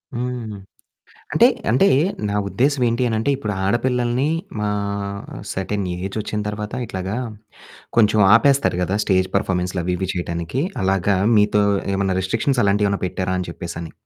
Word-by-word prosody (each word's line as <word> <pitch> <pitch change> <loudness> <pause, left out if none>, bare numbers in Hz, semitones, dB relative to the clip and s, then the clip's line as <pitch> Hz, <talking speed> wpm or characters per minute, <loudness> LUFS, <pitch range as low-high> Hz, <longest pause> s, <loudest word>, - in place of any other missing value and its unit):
హ్మ్. 120 -3 -4 0.8
అంటే, - - +7 0.2
అంటే 135 +11 +4 0.4
నా 100 - -2
ఉద్దేశం 135 +1 +1
ఏంటి 120 +2 0
అని 110 - -1
అంటే, 140 +6 +1
ఇప్పుడు 105 -6 -3
ఆడపిల్లల్ని 120 +5 +1 0.3
మా 105 - 0 0.8
సెర్టైన్ 95 +1 -2
ఏజ్ 95 +3 -5
వొచ్చిన 105 0 -3
తరువాత, 105 +1 -5
ఇట్లాగా 95 +1 -4 0.8
కొంచెం 105 -1 +4 0.2
ఆపేస్తారు 135 -6 +3
కదా! 95 +3 0
స్టేజ్ 95 -1 +2
పెర్ఫార్మన్స్‌లు, 90 -2 -1
అవి, 90 - 0
ఇవి 95 0 -3
చేయడానికి. 85 - -2 0.2
అలాగా 95 +1 +2 0.2
మీతో 105 0 +4 0.3
ఏమైనా 95 -1 0
రిస్ట్రిక్షన్స్ 115 +7 0
అలాంటివేమన్నా 100 -1 +1
పెట్టారా 95 0 -2
అని 90 - -4
చెప్పేసి 85 0 -7
అని. 80 - -8
105 Hz, 140 wpm, -21 LUFS, 95-120 Hz, 0.8 s, అంటే